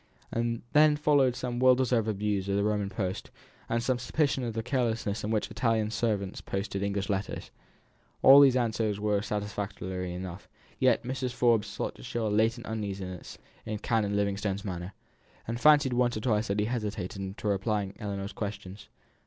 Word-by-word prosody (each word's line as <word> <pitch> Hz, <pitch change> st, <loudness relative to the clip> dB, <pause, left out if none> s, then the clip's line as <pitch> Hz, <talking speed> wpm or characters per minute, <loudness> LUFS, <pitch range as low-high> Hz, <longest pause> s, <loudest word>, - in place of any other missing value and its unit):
And 115 Hz, 0 st, -1 dB
then 150 Hz, 0 st, +6 dB
followed 145 Hz, -4 st, +3 dB
some 125 Hz, -1 st, -3 dB
well 130 Hz, 0 st, +6 dB
deserved 125 Hz, -3 st, +1 dB
abuse 100 Hz, -2 st, -1 dB
of 100 Hz, -, +1 dB
the 100 Hz, -, +1 dB
Roman 105 Hz, -1 st, 0 dB
post, 95 Hz, -2 st, -3 dB, 0.4 s
and 115 Hz, 0 st, 0 dB
some 125 Hz, 0 st, 0 dB
suspicion 140 Hz, +1 st, 0 dB
of 115 Hz, -2 st, -3 dB
the 115 Hz, -, -2 dB
carelessness 115 Hz, -4 st, -1 dB
with 105 Hz, -, -2 dB
which 110 Hz, -2 st, -1 dB
Italian 110 Hz, -3 st, +1 dB
servants 105 Hz, -5 st, -1 dB
posted 95 Hz, 0 st, -3 dB
English 100 Hz, -1 st, -1 dB
letters. 100 Hz, 0 st, -3 dB, 0.7 s
All 135 Hz, +1 st, +10 dB
these 135 Hz, -3 st, +7 dB
answers 110 Hz, -4 st, 0 dB
were 105 Hz, -1 st, +1 dB
satisfactory 100 Hz, -3 st, -4 dB
enough, 90 Hz, +1 st, -7 dB, 0.3 s
yet 130 Hz, -3 st, +3 dB
Mrs. 125 Hz, 0 st, -3 dB
Forbes 115 Hz, -4 st, +2 dB
thought -, -, -3 dB
she -, -, -12 dB
saw 115 Hz, -2 st, 0 dB
a -, -, 0 dB
latent 115 Hz, +3 st, +1 dB
uneasiness 100 Hz, -4 st, -5 dB, 0.3 s
in 110 Hz, -, -4 dB
Canon 105 Hz, -2 st, 0 dB
Livingstone's 100 Hz, 0 st, -1 dB
manner, 90 Hz, 0 st, -5 dB, 0.5 s
and 115 Hz, +2 st, -3 dB
fancied 145 Hz, -4 st, +6 dB
once 120 Hz, -2 st, +2 dB
or -, -, -4 dB
twice 110 Hz, -2 st, +1 dB
that 100 Hz, +1 st, -1 dB
he 105 Hz, -, +2 dB
hesitated 105 Hz, -5 st, -3 dB
in 95 Hz, 0 st, -5 dB
replying 100 Hz, -1 st, 0 dB
to -, -, -18 dB
Ellinor's 100 Hz, -1 st, -4 dB
questions. 100 Hz, -1 st, -6 dB
105 Hz, 175 wpm, -29 LUFS, 100-120 Hz, 0.7 s, All